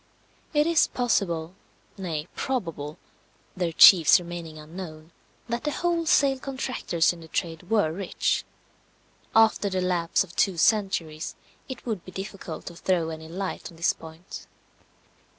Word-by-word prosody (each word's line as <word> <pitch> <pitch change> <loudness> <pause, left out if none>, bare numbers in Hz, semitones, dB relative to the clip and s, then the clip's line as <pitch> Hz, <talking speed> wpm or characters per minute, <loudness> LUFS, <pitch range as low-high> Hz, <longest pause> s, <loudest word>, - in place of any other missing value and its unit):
It 295 -1 +3
is 335 -1 +4
possible, 180 -9 0 0.4
nay 165 -5 -4
probable 165 - -3 0.6
(their 175 -3 -1
chiefs 165 0 +8
remaining 170 -2 -7
unknown), 155 0 -9 0.4
that 235 0 -3
the 300 - 0
wholesale 330 -4 +2
contractors 260 - 0
in 175 - -12
the 160 - -11
trade 165 +1 -4
were 210 -8 +3
rich. 185 +2 -1 0.9
After 220 -2 +4
the 190 -1 -1
lapse 180 -2 +1
of 175 -3 -14
two 190 -3 +2
centuries, 165 -5 +1 0.3
it 260 - -7
would 220 -7 -3
be 185 - -11
difficult 190 -3 -7
to 175 - -8
throw 170 -2 0
any 160 0 -7
light 190 +3 -4
on 165 - -16
this 165 - +2
point. 160 +3 -11
180 Hz, 135 wpm, -26 LUFS, 165-220 Hz, 0.9 s, chiefs